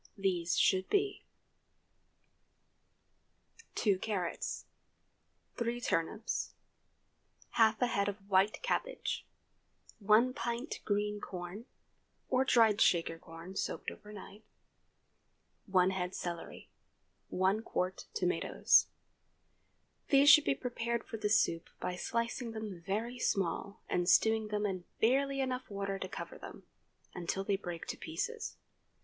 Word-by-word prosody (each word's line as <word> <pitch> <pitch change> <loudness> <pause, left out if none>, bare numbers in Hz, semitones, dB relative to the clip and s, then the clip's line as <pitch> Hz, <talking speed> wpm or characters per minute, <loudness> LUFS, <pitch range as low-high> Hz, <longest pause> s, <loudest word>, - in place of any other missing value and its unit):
These 180 -4 0
should 190 -1 +3
be:— 405 0 0 2.5
2 200 -4 +2
carrots. 190 -5 -3 0.9
3 235 +1 -1
turnips. 215 +1 -1 1.0
Half 220 -1 +4
a - - +6
head 200 -4 +1
of 200 - -5
white 200 - +2
cabbage. - - -2 0.7
1 220 +5 +4
pt. 240 +4 -3
green 210 0 0
corn—or 205 +7 -5
dried 225 -4 +5
Shaker 165 -1 +3
corn, 165 +3 -10
soaked - - -2
over 210 - -12
night. 210 +1 -11 1.2
1 185 -1 +4
head 180 -1 -3
celery. 170 -1 -6 0.6
1 190 +4 +1
qt. 185 -4 -2
tomatoes. 445 - +3 1.2
These 280 +1 +8
should 305 - +8
be - - +2
prepared 235 -2 -2
for 225 - -7
the 210 -1 -1
soup 165 -6 +2
by 180 - -2
slicing 230 +4 -2
them 215 -5 -6
very 225 +7 -3
small, 195 -1 -1
and 175 0 +1
stewing 220 -1 +4
them 210 0 -1
in 185 -3 -2 0.2
barely 275 +4 +2
enough 255 -1 -2
water 195 -1 -3
to 185 - -4
cover - - -7
them, - - -10 0.5
until 180 +2 -2
they 200 0 +1
break 175 -3 -6
to - - -5
pieces. 470 -2 -4
210 Hz, 115 wpm, -33 LUFS, 185-235 Hz, 2.5 s, These